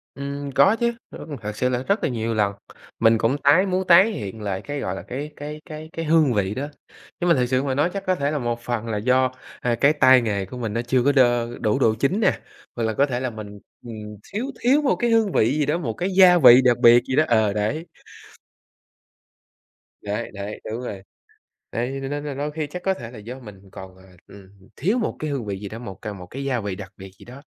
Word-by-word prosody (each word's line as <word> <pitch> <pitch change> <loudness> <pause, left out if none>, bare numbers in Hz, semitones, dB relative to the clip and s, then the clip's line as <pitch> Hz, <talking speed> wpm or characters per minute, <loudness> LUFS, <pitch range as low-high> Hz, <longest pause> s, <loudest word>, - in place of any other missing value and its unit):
Ừm, 140 0 -5
có 140 - +4
chứ. 235 0 0 0.2
Ơ, - - -9 0.2
thật 105 0 -5
sự 125 - +1
là 125 0 -1
rất 200 +8 0
là - - +1
nhiều 115 -2 -2
lần, 100 -2 +1 0.5
mình 115 0 +5
cũng 125 +5 +1
tái 150 +8 +4
muốn 185 0 -1
tái 190 +6 +7
hiện 105 - -6
lại 100 -1 -3
cái, 145 -1 -5
gọi 90 - -3
là, - - -7
cái 145 +4 -6
cái 150 +1 -7
cái 155 0 -8
cái 165 - -4
hương 155 -4 +3
vị 100 0 0
đó, 140 +2 -3 0.5
nhưng 175 - 0
mà - - +6
thực 125 -1 +1
sự 130 +1 +1
mà 135 -2 -1
nói 145 +6 +1
chắc 195 -1 -4
có 185 - +2
thể 145 -3 -1
là 150 - -1
một 120 -1 -3
phần 120 -1 -3
là 110 -2 -2
do, 130 +3 +2 0.3
ờ, 120 -1 0
cái 140 +2 +5
tay 130 -4 +6
nghề 100 -4 -2
của 125 - -10
mình 115 -4 -3
nó 115 +2 -1
chưa 125 +1 +1
có 145 - +4
đơ 120 -3 +3
đủ 105 -3 +1
độ 110 -1 +3
chín 140 - 0
nè, - - +2 0.4
hoặc 120 - -2
là 110 0 0
có 140 +5 +3
thể 125 -2 -3
là 130 -1 -2
mình, 105 -2 -9 0.3
ừm, 115 - -7 0.4
thiếu 225 +6 -2
thiếu 275 +5 +3
một 275 - +2
cái 240 -1 0
hương 225 -4 +2
vị 130 +8 +2
gì 145 - +1
đó, 155 +3 0
một 120 -10 -3
cái 180 - -3
gia 180 -2 +8
vị 125 -3 +9
đặc 120 -1 +4
biệt 120 -1 +7
gì 130 - -2
đó, 155 - +5
ờ, 110 -3 +3
đấy. 125 +11 -2 2.2
Đấy, 105 +3 -4
đấy, 100 +2 -6
đúng 115 +3 -4
rồi. 100 -6 -6 0.7
Đấy, 125 +4 -2
cho 135 - -4
nên 145 +1 -4
là 145 -2 -4
đôi 145 +2 -3
khi 155 -1 -3
chắc 180 +4 -8
có 190 0 +1
thể 120 -8 -9
là 120 - -11
do 125 +5 -9
mình 100 -4 -13
còn, 95 -1 -10
à, 95 - -18 0.2
ừm, 100 -2 -14 0.3
thiếu 200 - 0
một 225 - -2
cái 155 -1 -4
hương 130 -6 -3
vị 100 -1 -4
gì 100 - -6
đó, 110 - -8
một 100 -6 -8
ca 105 - -4
một 90 -3 -10
cái 135 +8 -7
gia 130 -4 -1
vị 100 -3 -4
đặc 95 -1 -9
biệt 95 0 -11
gì - - -14
đó, 130 +4 -12
125 Hz, 255 wpm, -23 LUFS, 110-150 Hz, 2.2 s, vị